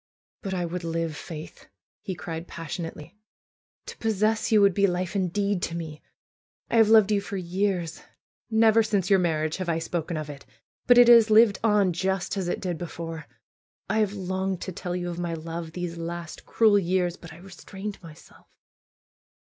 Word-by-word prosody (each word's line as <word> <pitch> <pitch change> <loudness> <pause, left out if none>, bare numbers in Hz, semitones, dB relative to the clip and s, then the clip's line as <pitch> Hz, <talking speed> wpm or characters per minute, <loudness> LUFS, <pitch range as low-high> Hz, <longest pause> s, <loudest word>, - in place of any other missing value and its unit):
"But 195 -2 -3
I 175 -1 -1
would 175 +1 -5
live. 165 -1 -2
Faith!" 160 0 -9 0.3
he 190 - -5
cried, 165 +1 -6
passionately. 165 +2 -7 0.7
"To - - -8
possess 220 0 0
you 215 - +6
would 200 -2 +5
be 200 +2 +3
life 180 +1 -2
indeed 200 +1 0
to 170 - -3
me. 160 -3 -6 0.7
I 230 - +2
have 225 -2 +6
loved 215 -2 +6
you 205 -1 +2
for 200 0 -5
years. 180 -2 -2 0.5
Never 225 0 +5
since 205 -4 0
your 195 - +6
marriage 155 -3 0
have 185 -2 -4
I 165 - +1
spoken 165 0 -3
of 155 -1 -4
it; 145 -2 -9 0.4
but 245 - +7
it 245 -1 +8
has 230 -2 +8
lived 215 -2 +5
on 205 -5 +3
just 190 +2 -1
as 190 -3 -2
it - - -2
did 175 -3 -3
before. 165 -3 -6 0.6
I 220 - +1
have 210 -2 +1
longed 190 -1 -2
to 190 - -4
tell 180 0 -5
you 175 -1 -3
of 175 0 -5
my 170 -1 -2
love 165 0 -6
these 175 -1 -5
last, 170 0 -7
cruel 215 -3 +4
years! 180 -1 0
But 165 -3 -12
I 160 - -12
restrained 195 +3 -9
myself." 165 -3 -15
180 Hz, 180 wpm, -26 LUFS, 165-200 Hz, 0.7 s, it